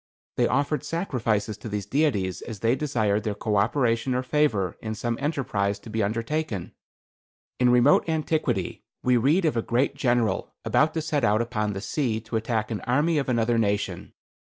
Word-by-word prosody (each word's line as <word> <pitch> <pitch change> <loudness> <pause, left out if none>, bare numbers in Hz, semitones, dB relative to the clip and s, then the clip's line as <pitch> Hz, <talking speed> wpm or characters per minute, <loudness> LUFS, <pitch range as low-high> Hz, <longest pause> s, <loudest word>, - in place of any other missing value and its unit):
They - - +3
offered 140 +3 0
sacrifices 115 - -1
to 115 - -7
these 105 -2 -3
deities 105 - 0
as 110 -4 -8
they 115 +2 +3
desired 110 -8 0
their 105 -2 -2
co 105 0 -1
operation 115 +3 +1
or 125 - 0
favor 125 - +1
in 110 0 -4
some 120 +1 -2
enterprise 115 -9 -1
to 110 - -12
be 110 0 0
undertaken. 115 - -2 0.9
"In 125 -1 +4
remote 125 +6 +4
antiquity, 160 0 -1 0.2
we 125 -1 +4
read 150 +10 +3
of 155 - +1
a 115 - +1
great 120 +4 +1
General 120 -4 0
about 155 +2 +2
to 160 - -1
set 150 -3 -1
out 110 -2 +3
upon 105 -3 -2
the 95 - -5
sea 115 -2 -1
to 110 +1 -6
attack 110 -1 -1
the 110 -3 -4
army 150 +5 +3
of 135 - -2
another 115 -1 +2
nation. 105 -1 -1
120 Hz, 175 wpm, -25 LUFS, 110-145 Hz, 0.9 s, In